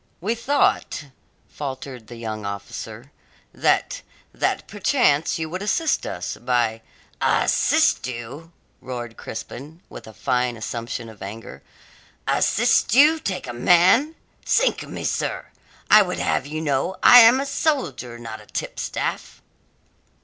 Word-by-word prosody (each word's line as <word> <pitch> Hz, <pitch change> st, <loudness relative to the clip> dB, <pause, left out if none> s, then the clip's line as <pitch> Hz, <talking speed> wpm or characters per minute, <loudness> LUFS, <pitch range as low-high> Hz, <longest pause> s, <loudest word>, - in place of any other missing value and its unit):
"We 205 Hz, +6 st, -1 dB
thought," 235 Hz, -, 0 dB, 0.4 s
faltered 130 Hz, -4 st, -7 dB
the 120 Hz, -, -10 dB
young 110 Hz, -2 st, -6 dB
officer, 105 Hz, +5 st, -7 dB, 0.4 s
"that -, -, +1 dB, 0.3 s
that -, -, -1 dB
perchance 190 Hz, -, +1 dB
you 160 Hz, -1 st, -3 dB
would 185 Hz, +2 st, -4 dB
assist 290 Hz, +10 st, 0 dB
us 90 Hz, -, -5 dB
by 120 Hz, -2 st, 0 dB, 0.2 s
" -, -, -34 dB
"Assist -, -, +2 dB
you!" 130 Hz, +7 st, -8 dB, 0.3 s
roared 120 Hz, -3 st, -6 dB
Crispin, 140 Hz, +8 st, -8 dB
with -, -, -11 dB
a 110 Hz, -, -11 dB
fine 125 Hz, -2 st, -1 dB
assumption 115 Hz, +1 st, -5 dB
of 110 Hz, -3 st, -14 dB
anger. 105 Hz, +4 st, -8 dB, 0.7 s
"Assist -, -, +2 dB
you 300 Hz, +4 st, +6 dB
take 185 Hz, -, -4 dB
a 120 Hz, -, -6 dB
man? 180 Hz, -, +4 dB, 0.3 s
Sink -, -, +2 dB
me, -, -, -7 dB
sir, -, -, -2 dB, 0.5 s
I 215 Hz, +1 st, +9 dB
would 180 Hz, -2 st, -2 dB
have 135 Hz, -, -1 dB
you 155 Hz, +2 st, -4 dB
know 145 Hz, +4 st, -1 dB
I 245 Hz, -, +10 dB
am 235 Hz, +2 st, +7 dB
a 275 Hz, -, -2 dB
soldier, 255 Hz, -, -2 dB
not 115 Hz, -2 st, -8 dB
a -, -, -18 dB
tipstaff!" -, -, -4 dB
135 Hz, 135 wpm, -22 LUFS, -, 0.7 s, I